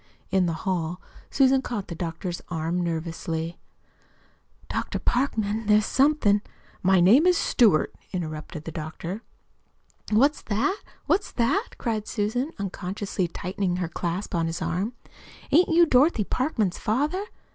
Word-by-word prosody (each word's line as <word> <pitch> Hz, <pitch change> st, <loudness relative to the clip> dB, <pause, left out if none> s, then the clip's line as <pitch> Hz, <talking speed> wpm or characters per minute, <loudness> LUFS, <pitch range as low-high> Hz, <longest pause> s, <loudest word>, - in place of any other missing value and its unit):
In 185 Hz, -1 st, +3 dB
the 165 Hz, -, 0 dB
hall 180 Hz, -2 st, -1 dB, 0.3 s
Susan 270 Hz, -1 st, +4 dB
caught 220 Hz, -7 st, -4 dB
the -, -, -5 dB
doctor's 170 Hz, +1 st, -4 dB
arm 165 Hz, +1 st, -1 dB
nervously. 165 Hz, 0 st, -3 dB, 1.1 s
"Dr. -, -, -2 dB
Parkman, 225 Hz, -4 st, 0 dB
there's 210 Hz, 0 st, +5 dB
somethin' 265 Hz, -8 st, +3 dB, 0.2 s
" -, -, -29 dB
"My 190 Hz, -, +6 dB
name 230 Hz, -, +6 dB
is 360 Hz, -1 st, +5 dB
Stewart," 210 Hz, -, +3 dB, 0.2 s
interrupted 155 Hz, -2 st, -5 dB
the 165 Hz, -, -6 dB
doctor. 165 Hz, +5 st, -5 dB, 0.9 s
"What's 275 Hz, +8 st, +3 dB
that? 260 Hz, -, 0 dB, 0.2 s
What's 405 Hz, -, +1 dB
that?" 280 Hz, -, 0 dB
cried 220 Hz, -3 st, -2 dB
Susan, 245 Hz, +7 st, -1 dB
unconsciously 195 Hz, -1 st, -3 dB
tightening 180 Hz, +2 st, -2 dB
her 180 Hz, -1 st, -1 dB
clasp 175 Hz, +4 st, -3 dB
on 165 Hz, -2 st, +1 dB
his 165 Hz, +1 st, -3 dB
arm. 200 Hz, +8 st, -2 dB, 0.6 s
"Ain't 340 Hz, +6 st, +5 dB
you 340 Hz, +1 st, +6 dB
Dorothy 265 Hz, -4 st, +4 dB
Parkman's 220 Hz, -, -1 dB
father?" 290 Hz, -, 0 dB
200 Hz, 135 wpm, -26 LUFS, 175-255 Hz, 1.1 s, My